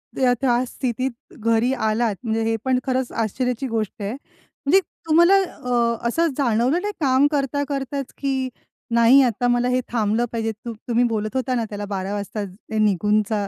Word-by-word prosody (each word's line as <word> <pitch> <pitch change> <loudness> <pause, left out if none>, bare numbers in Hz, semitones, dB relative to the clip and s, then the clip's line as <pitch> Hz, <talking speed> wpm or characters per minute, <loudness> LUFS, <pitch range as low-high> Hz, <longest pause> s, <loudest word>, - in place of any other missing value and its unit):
त्या, 255 -2 +3
त्या 245 -2 +2
स्थितीत 255 0 -2 0.3
घरी 230 +2 +2
आलात 220 -2 0
म्हणजे 225 -1 -1
हे 225 0 +1
पण 260 -1 +2
खरंच 260 -1 0
आश्चर्याची 250 +3 -1
गोष्ट 220 -2 -3
आहे. 200 +1 -2
म्हणजे 280 +4 -1 0.3
तुम्हाला 340 +4 +6
अ, 235 -7 -1
असं 330 +8 +2
जाणवलं 255 +5 +2
नाही 415 0 -3
काम 270 0 +4
करता 285 0 0
करताच, 275 -1 -3
की 265 -2 -1 0.5
नाही 235 +4 +7
आता 245 0 +1
मला 245 0 +2
हे 250 0 +2
थांबलं 225 0 +1
पाहिजे, 225 -1 -1
त 220 +2 -9 0.2
तुम्ही 240 0 +2
बोलत 215 0 -3
होता 255 -1 0
ना 230 - 0
त्याला 205 0 -5
12 195 -1 -3
वाजता 205 +1 -4 0.4
निघून 210 0 +3
ज - - +2
240 Hz, 170 wpm, -22 LUFS, 220-265 Hz, 0.5 s, नाही